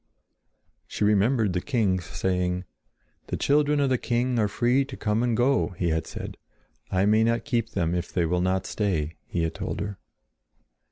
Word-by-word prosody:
She - - -3
remembered 105 0 +3
the 90 - 0
king's 100 - 0
saying: 90 0 -1 0.6
"The - - -2
children 145 0 +2
of 140 -2 +2
the 130 - +2
king 120 0 0
are 105 - +3
free 120 +6 +2
to 135 - -9
come 105 +1 0
and 120 -2 +1
go," 120 -5 +2
he 85 -2 0
had 80 0 -1
said. - - -7 0.5
"I 95 +1 +2
may 110 +2 +4
not 115 +1 +1
keep 115 -5 0
them 85 -3 0
if 90 -1 -2
they 85 - +1
will 90 +2 +1
not 95 +1 0
stay," 85 -7 -1
he 85 - -1
had 80 0 -1
told - - -4
her. 100 -1 -4
105 Hz, 180 wpm, -26 LUFS, 90-120 Hz, 0.6 s, may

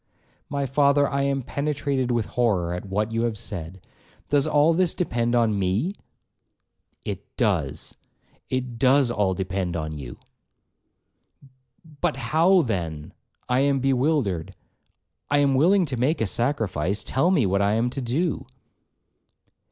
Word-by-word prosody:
'My 140 -1 -1
father, 140 +1 +3
I 140 0 -1
am 140 -1 0
penetrated 140 -2 -2
with 120 -3 0
horror 100 -9 0
at 90 +3 -6
what 105 +3 -1
you 115 0 -1
have 115 -2 -1
said,—does 95 - -4
all 150 +2 +4
this 180 0 +1
depend 120 -8 0
on 110 -4 +2
me?' 100 - 0 1.1
'It - - -4
does,—it 125 -2 -4
does 130 0 +4
all 100 -5 0
depend 95 -2 -3
on 80 -1 -4
you.' 65 -3 -8 1.7
'But 155 0 -3
how, 160 +8 +3
then,—I 90 - -4
am 140 0 +2
bewildered,—I 130 - -2
am 140 -1 +3
willing 180 +8 +4
to 135 -5 -4
make 135 +7 +1
a 115 - +1
sacrifice,—tell 110 - 0
me 165 - +3
what 100 +1 +1
I 100 +1 +2
am 120 +2 0
to 135 - -4
do.' 145 +8 -1
125 Hz, 125 wpm, -24 LUFS, 100-145 Hz, 1.7 s, all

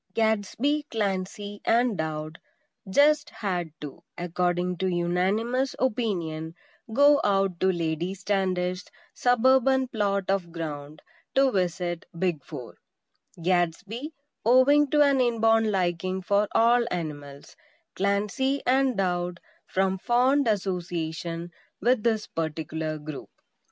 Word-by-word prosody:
XXXIV - - -44
Gadsby, 225 +7 +1
Clancy 205 -1 -3
and 235 -1 +2
Dowd 155 -1 -4 0.5
"just 295 +7 +4
had" 180 -5 -3
to, 145 -2 -8 0.2
according 175 +1 -1
to 190 - -1
unanimous 190 +9 0
opinion, 170 -10 -2 0.4
go 285 +4 +5
out 195 -3 +1
to 190 - +3
Lady 170 +1 -2
Standish's 185 -1 -1 0.2
suburban 260 +2 +3
plot 200 -4 0
of 190 -3 -1
ground 150 -3 -6 0.3
to 270 0 +4
visit 175 -3 -2
"Big 165 -5 -1
Four;" 130 -7 -9 0.6
Gadsby, 190 - -1 0.3
owing 270 +5 +5
to 295 +1 +5
an 280 -2 +3
inborn 225 -2 +3
liking 185 -1 -1
for 200 +3 +2
all 235 +1 +4
animals; 145 -5 -6 0.4
Clancy 210 +8 0
and 260 -2 +2
Dowd 180 -2 -1 0.3
from 190 0 0
fond 255 +5 +2
association 175 -4 -2 0.3
with 245 +2 +2
this 220 -1 +1
particular 160 -1 -3
group. 150 -1 -8
190 Hz, 110 wpm, -26 LUFS, 175-235 Hz, 0.6 s, go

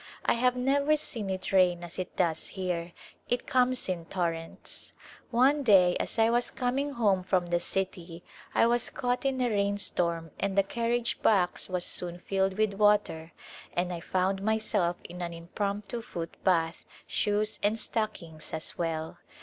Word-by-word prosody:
I - - +4
have 250 +1 +2
never 280 +4 +2
seen 230 -9 -4
it 185 0 -3
rain 180 -2 +4
as 175 +2 -8
it 185 - -5
does 165 -3 0
here; 180 -3 -3 0.4
it 245 0 0
comes 255 0 +2
in 175 -3 -3
torrents. 165 -2 -4 0.4
One 265 +4 +4
day 190 -8 +5
as - - -2
I 225 0 +5
was 240 +1 +1
coming 270 +3 -1
home 205 -7 +2
from 185 -1 +1
the 175 0 0
city 175 -2 -3 0.3
I - - +5
was 240 0 +1
caught 250 0 -2
in 270 -1 +1
a 245 - +2
rain 200 -1 +1
storm 170 -4 0
and 200 0 -1
the 195 - +6
carriage 235 +3 -1
box 190 -4 +2
was 180 -1 -1
soon 175 -1 +3
filled 190 +1 -1
with 215 -2 +2
water 205 -6 +2 0.4
and 180 +1 -1
I 170 - -4
found 190 +3 0
myself 210 -4 +1
in 180 +1 -8
an 170 -1 -4
impromptu 200 +6 -3
foot 170 -7 -6
bath, 165 -3 +1 0.2
shoes 210 +1 0
and 210 +2 +2
stockings 175 -10 -4
as 160 - -3
well. 160 -2 -3
195 Hz, 165 wpm, -29 LUFS, 175-230 Hz, 0.4 s, the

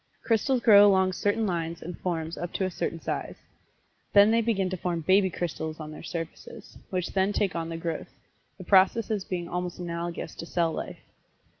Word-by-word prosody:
Crystals 240 +3 +1
grow 205 -3 +8
along 190 -1 +3
certain 205 +4 0
lines 170 -3 -3
and 175 +1 -6
forms 165 -2 -3
up 175 - -5
to 190 - 0
a 185 - -2
certain 165 -1 -3
size. - - -4 0.8
Then 205 +1 +7
they 230 +1 +3
begin 210 -4 0
to 185 - -2
form 170 -1 -2
"baby 190 +4 +4
crystals" 160 -2 -4
on 155 -1 -7
their 155 - -9
surfaces, 165 -1 -7
which 185 -2 -3
then 190 +1 +2
take 200 -4 0
on 165 -1 -3
the 165 - -4
growth 165 -1 -4 0.5
the 185 - -9
processes 200 +2 +3
being 175 -2 -4
almost 180 0 -4
analogous 170 -2 -4
to - - -6
cell 170 -2 +1
life. - - -5
180 Hz, 185 wpm, -27 LUFS, 170-200 Hz, 0.8 s, grow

